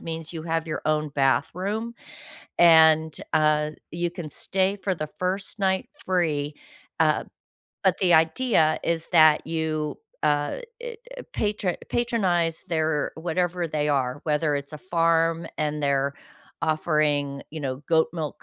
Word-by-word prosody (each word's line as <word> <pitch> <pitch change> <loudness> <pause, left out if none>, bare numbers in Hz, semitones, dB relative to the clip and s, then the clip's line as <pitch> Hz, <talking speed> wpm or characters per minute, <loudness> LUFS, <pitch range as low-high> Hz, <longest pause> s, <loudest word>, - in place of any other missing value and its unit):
means 165 0 -6
you 160 -1 -6
have 165 0 -1
your 155 - -3
own 155 -1 0
bathroom 185 - 0 0.7
and, 160 -2 +6 0.2
uh, 150 0 +2 0.2
you 175 +1 -2
can 175 -4 -7
stay 190 +5 0
for 195 -1 -2
the 155 -2 -5
first 190 +3 -1
night 190 -1 0 0.2
free, 155 -5 0 0.5
uh, - - +3 0.6
but - - +3
the 180 -2 +3
idea 160 +1 +3
is 165 -1 -1
that 155 -2 +6
you, 155 -2 -2 0.3
uh, 145 - +1 0.2
eh, 485 -1 -6 0.2
uh, - - -6
patro 205 -4 -1 0.2
patronize 185 -9 0
their 155 -2 0
whatever 175 +1 -1
they 150 -1 0
are, 130 -1 0
whether 150 -1 +1
it's 140 +2 -6
a 150 - -7
farm 165 -1 +1
and 150 -1 -1
they're 140 0 +1 0.5
offering, 150 -3 0
you 155 - -6
know, 130 -3 -3
goat 160 -1 +3
milk 150 -2 -5
160 Hz, 140 wpm, -25 LUFS, 150-175 Hz, 0.7 s, and